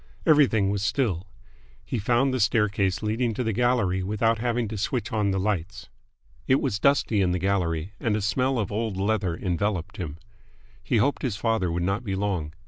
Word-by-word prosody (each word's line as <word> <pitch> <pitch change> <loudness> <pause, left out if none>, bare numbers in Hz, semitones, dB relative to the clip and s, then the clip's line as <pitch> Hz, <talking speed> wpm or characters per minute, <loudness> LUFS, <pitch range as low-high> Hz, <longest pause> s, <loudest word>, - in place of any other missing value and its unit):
Everything 130 - +4
was 100 -1 -1
still. 100 - 0 0.6
He 125 - -2
found 120 +5 +2
the 130 - 0
staircase 100 -3 +1
leading 115 +1 0
to 125 - -1
the 110 -2 -1
gallery 115 -5 +1
without 110 +4 +1
having 120 0 0
to 110 - -5
switch 115 0 -2
on 105 -2 +1
the 95 0 0
lights. 100 0 -3 0.6
It 130 - +4
was 100 - -1
dusty 120 -5 +3
in 90 -2 +2
the - - 0
gallery, 90 -2 -1
and 110 -3 0
a 105 - -1
smell 130 +5 +1
of 105 -4 -2
old 110 -2 -2
leather 100 -4 0
enveloped 95 -1 -2
him. 80 -4 -5 0.7
He 120 - +1
hoped 140 +7 +1
his 125 -7 -1
father 110 -5 0
would 85 +1 -1
not 100 +6 -1
be 100 -4 -2
long. 95 -6 -2
105 Hz, 190 wpm, -25 LUFS, 95-115 Hz, 0.7 s, Everything